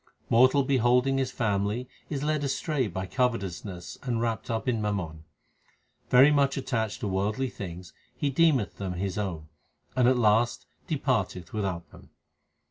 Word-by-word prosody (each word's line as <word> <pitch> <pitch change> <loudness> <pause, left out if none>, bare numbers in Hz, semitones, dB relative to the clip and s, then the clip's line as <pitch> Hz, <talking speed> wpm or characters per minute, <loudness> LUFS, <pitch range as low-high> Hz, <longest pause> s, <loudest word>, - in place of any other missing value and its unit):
Mortal 130 +4 +5
beholding 130 +1 +3
his 130 -1 0
family 105 +1 -1 0.2
is 145 -2 -3
led 150 -1 0
astray 140 -1 0
by 95 0 -4
covetousness 95 -6 -2
and 120 -3 -1
wrapped 115 -1 -2
up 115 +2 -2
in 115 -4 +1
mammon. 90 -7 -3 0.8
Very 135 +4 +7
much 140 -1 +2
attached 110 -4 -2
to 105 - -1
worldly 105 +7 -1
things, 90 -2 -8 0.2
he 145 - -1
deemeth 135 -8 +2
them 95 -2 -3
his 95 +2 -3
own, 85 -7 -4 0.5
but 125 -2 +3
at 130 0 +4
last 115 -3 +2 0.2
departeth 110 - -1
without 95 -5 -3
them. - - -16
115 Hz, 145 wpm, -28 LUFS, 95-130 Hz, 0.8 s, Very